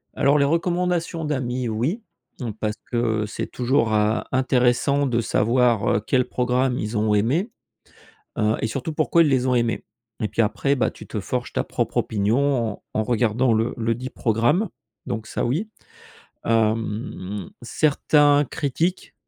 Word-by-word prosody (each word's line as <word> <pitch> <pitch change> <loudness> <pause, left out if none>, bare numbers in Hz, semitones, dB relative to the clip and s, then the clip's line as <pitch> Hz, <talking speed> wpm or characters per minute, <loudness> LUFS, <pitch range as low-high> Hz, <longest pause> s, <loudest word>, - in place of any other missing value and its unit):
Alors 140 +2 +3
les 140 - +3
recommandations 170 0 0
d'amis, 130 -4 -2
oui. 130 - -1 0.4
Mmh, 120 -3 -3
parce 105 -1 -1 0.2
que 115 -3 0
c'est 105 - -4
toujours 125 -3 +1
à 105 +2 +1
intéressant 130 +2 +2
de 120 -2 +1
savoir, 115 0 +2
heu, - - +2
quel 125 -2 +2
programme 125 0 0
ils 105 +1 -3
ont 105 0 +2
aimés. 140 - +1 0.9
Heu 110 0 +2
et - - 0
surtout 135 +7 -4
pourquoi 160 +2 +3
ils 160 - +3
les 130 -2 +2
ont 130 - +2
aimés 120 -1 0 0.4
et 110 - 0
puis 110 +3 +1
après, 115 +6 +1
bah 125 - +1
tu - - -12
te - - -4
forges - - -3
ta - - -1
propre - - -3
opinion 115 +5 +1
en - - -16
en 110 - +1
regardant 120 +2 +1
le 115 +1 +1
le 115 0 0
dit 130 +2 -6
programme. 120 - +1 0.4
Donc 110 -1 -4
ça - - -2
oui. 160 - -1 0.8
Hem, 110 -4 -1
certains 145 +2 +3
critiquent 165 +6 -2
125 Hz, 160 wpm, -23 LUFS, 110-140 Hz, 0.9 s, Alors